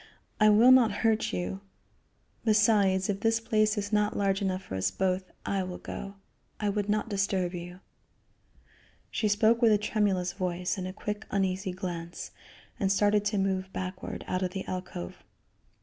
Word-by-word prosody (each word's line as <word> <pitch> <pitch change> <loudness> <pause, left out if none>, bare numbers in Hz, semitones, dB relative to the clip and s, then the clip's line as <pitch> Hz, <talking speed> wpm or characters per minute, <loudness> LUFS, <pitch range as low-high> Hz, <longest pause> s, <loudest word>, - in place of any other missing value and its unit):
I 215 0 +6
will 225 +4 +7
not 250 -4 +6
hurt 220 -1 +2
you. 190 +2 -3 0.8
Besides, 205 -4 +3
if 195 -1 -1
this 225 +1 +2
place 215 -1 +1
is 205 +1 -3
not 210 0 +2
large 195 -1 +1
enough 190 -1 -1
for - - -9
us 95 0 0
both, 185 - -1 0.2
I 195 -1 0
will 185 -1 -5
go. 200 0 -7 0.4
I 210 - 0
would 205 0 -1
not 215 +2 +1
disturb 195 -3 0
you." 175 +1 -8 1.3
She 215 - 0
spoke 220 +3 +3
with 230 -2 +6
a 210 - +5
tremulous 200 -4 0
voice 180 -1 -2
and 185 -2 -4
a - - -4
quick, 210 +2 -5
uneasy 190 -1 -1
glance, 175 -2 -6 0.5
and 195 -1 +1
started 205 +1 +3
to 205 0 0
move 190 -1 -1
backward 185 0 -5
out 185 - -1
of 185 -1 -2
the 195 - -4
alcove. 180 - -6
195 Hz, 165 wpm, -29 LUFS, 185-210 Hz, 1.3 s, will